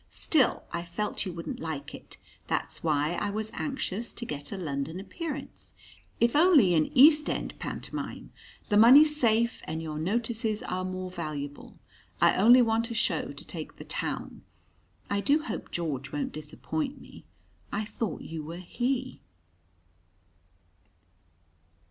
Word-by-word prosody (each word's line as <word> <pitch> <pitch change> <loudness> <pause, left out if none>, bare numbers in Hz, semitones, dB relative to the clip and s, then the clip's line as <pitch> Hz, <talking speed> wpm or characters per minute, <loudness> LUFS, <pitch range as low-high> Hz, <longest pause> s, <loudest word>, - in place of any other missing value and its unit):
Still, 285 -7 +2
I 170 - -3
felt 195 +4 -3
you - - -3
wouldn't 170 -1 -6
like 155 -3 -5
it. - - -11 0.3
That's - - -2
why 150 0 +1
I 205 +3 -1
was 215 +1 -3
anxious 240 -6 -3
to 240 - -6
get 145 -5 -6
a 200 - -4
London 160 0 -3
appearance 280 - -7 0.4
if 235 +2 +3
only 295 - +6
in 155 -2 +3
East 300 +3 +7
end - - -2
pantomime. - - -6 0.4
The 205 - +4
money's 285 +7 +8
safe, 235 0 +2
and 160 +1 -3
your 155 -2 -4
notices 220 +4 -1
are 185 0 -3
more 185 0 -4
valuable. 150 -4 -6 0.4
I - - +5
only 240 +6 +7
want 225 0 +1
a 230 - -4
show - - 0
to - - -10
take - - -7
the - - -9
town. - - -4 0.7
I 200 - 0
do 295 +6 +3
hope - - -5
George 140 -5 -3
won't 145 -1 -2
disappoint 260 - -4
me. - - -14 0.5
I 215 +1 -1
thought 215 -4 -4
you 160 -1 -6
were 165 +3 -7
he." 255 +8 -2
205 Hz, 145 wpm, -28 LUFS, 160-240 Hz, 0.7 s, money's